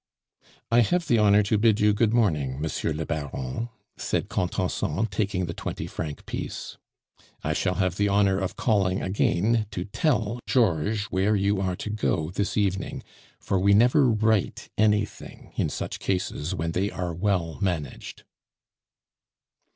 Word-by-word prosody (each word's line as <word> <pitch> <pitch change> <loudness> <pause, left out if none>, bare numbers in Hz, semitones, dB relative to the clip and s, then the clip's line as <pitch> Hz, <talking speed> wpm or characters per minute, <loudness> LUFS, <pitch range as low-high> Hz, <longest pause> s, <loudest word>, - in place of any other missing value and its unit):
"I 120 - +6
have 170 +8 +2
the 120 -4 +3
honor 105 0 +5
to 100 +1 +1
bid 110 -1 +4
you 105 0 +4
good 110 +1 +2
morning, 75 - +1
Monsieur 80 +1 -2
le 75 +1 -3
Baron," 75 - -4 0.3
said - - -2
Contenson, 90 +1 -1
taking 100 -4 -1
the 85 - -5
twenty - - -5
franc 75 -2 -6
piece. - - -5 0.7
"I 75 - 0
shall 90 +3 0
have 95 -1 0
the 100 - +2
honor 100 -1 +3
of 95 -1 -3
calling 100 -5 +1
again 105 +3 +1
to 90 -4 -4
tell 115 0 0
Georges 105 - +2
where 95 +3 +2
you 100 0 +1
are 95 -2 -1
to 105 - -5
go 85 -6 -1
this 100 +3 -2
evening, 95 -2 -1 0.4
for 95 - 0
we 100 +2 +4
never 125 +5 +5
write 110 -2 +1
anything 105 -1 -1
in - - 0
such - - -4
cases 90 -4 -2
when 80 +1 -2
they 95 +4 0
are 90 -3 -4
well 90 -2 -1
managed." 85 -8 -3
100 Hz, 150 wpm, -26 LUFS, 90-105 Hz, 0.7 s, I